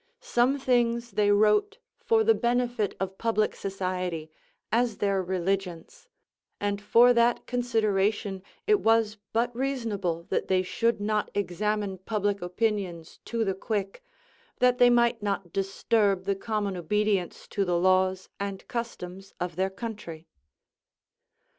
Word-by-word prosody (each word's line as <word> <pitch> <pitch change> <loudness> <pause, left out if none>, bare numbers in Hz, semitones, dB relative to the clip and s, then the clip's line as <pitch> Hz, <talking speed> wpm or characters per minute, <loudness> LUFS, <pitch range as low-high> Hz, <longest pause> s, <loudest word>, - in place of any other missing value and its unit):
Some 250 +4 +2
things 240 -3 +1
they 205 +1 +2
wrote 210 - +3 0.2
for 450 -1 +3
the 450 +1 +5
benefit 240 - 0
of 190 0 -4
public 220 -2 +1
society, 185 -4 -3 0.4
as 235 -1 +1
their 195 -1 +1
religions; 190 - -3 0.5
and 205 0 -1
for 235 +4 +6
that 235 0 +2
consideration 215 -5 0 0.2
it 420 -1 +4
was 225 -1 +2
but 235 +1 0
reasonable 225 -10 -2
that - - -1
they 185 -1 +2
should 230 +4 0
not 210 0 0
examine 205 0 -1
public 205 0 -1
opinions 180 -3 -2
to 230 -1 -1
the 195 - 0
quick, 195 0 -3 0.5
that 250 0 +3
they 245 0 +7
might 235 -1 +3
not 195 -4 -3
disturb 195 0 +1
the 200 - 0
common 205 -1 -2
obedience 195 +1 -1
to 200 - 0
the 175 -2 +1
laws 185 +1 +2
and 200 -1 -5
customs 195 -5 -6
of 175 -2 -3
their 190 +2 0
country. 190 -6 -7
205 Hz, 130 wpm, -27 LUFS, 190-235 Hz, 0.5 s, they